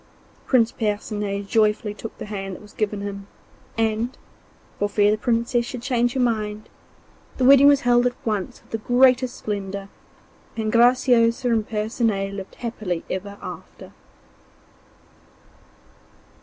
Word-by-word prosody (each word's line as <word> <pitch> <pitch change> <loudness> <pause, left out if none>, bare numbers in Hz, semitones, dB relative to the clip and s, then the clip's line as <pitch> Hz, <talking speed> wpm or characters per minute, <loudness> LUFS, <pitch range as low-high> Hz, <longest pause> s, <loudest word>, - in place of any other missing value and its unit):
Prince 235 -4 +3
Percinet 205 -2 -2
joyfully 210 0 +1
took 225 +1 -9
the - - -7
hand 195 -2 -5
that - - -12
was 210 - -15
given 210 -1 -2
him, 200 0 -6 0.5
and, 225 +2 0 0.6
for 205 - 0
fear 205 0 +3
the 215 - +1
Princess 235 +1 +1
should 245 0 -7
change 245 -2 +1
her 265 - -2
mind, 215 -3 -1 0.7
the 260 - 0
wedding 275 +1 +8
was 285 -1 +5
held 245 0 +4
at 245 - -3
once 210 -4 -3
with - - -26
the 225 - -2
greatest 250 +2 +3
splendour, 200 -1 -5 0.7
and 215 -1 -1
Graciosa 240 0 +4
and 220 -2 0
Percinet 215 -2 -1
lived 195 -1 -8
happily 215 -8 -4
ever 200 +2 -5
after. - - -9
220 Hz, 135 wpm, -23 LUFS, 205-245 Hz, 0.7 s, wedding